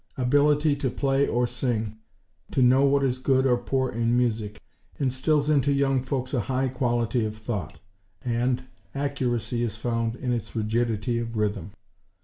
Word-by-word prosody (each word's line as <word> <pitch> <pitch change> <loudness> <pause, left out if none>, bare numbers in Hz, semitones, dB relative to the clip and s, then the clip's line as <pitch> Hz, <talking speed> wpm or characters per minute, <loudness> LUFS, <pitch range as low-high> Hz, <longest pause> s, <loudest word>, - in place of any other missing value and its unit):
Ability 145 +3 +3
to 140 -2 -1
play 135 +2 +1
or 120 +1 +1
sing; 115 -3 -2 0.5
to 130 - +2
know 130 +2 +5
what 140 0 +3
is 130 -1 0
good 130 0 +2
or 125 -2 +4
poor 130 +1 -1
in 115 +1 +1
music, 110 -4 -1 0.4
instills 140 +3 +1
into 145 -2 +3
young 135 -1 +2
folks 130 0 -3
a 130 - +2
high 130 +5 0
quality 120 -2 0
of 110 0 -4
thought; 110 -7 -5 0.5
and, 125 +1 0 0.3
accuracy 125 -5 -1
is 115 -3 -1
found 115 -1 -1
in 125 -1 -2
its 115 -2 -4
rigidity 115 +1 0
of 115 -1 -4
rhythm. 105 -4 -1
125 Hz, 155 wpm, -26 LUFS, 115-135 Hz, 0.5 s, know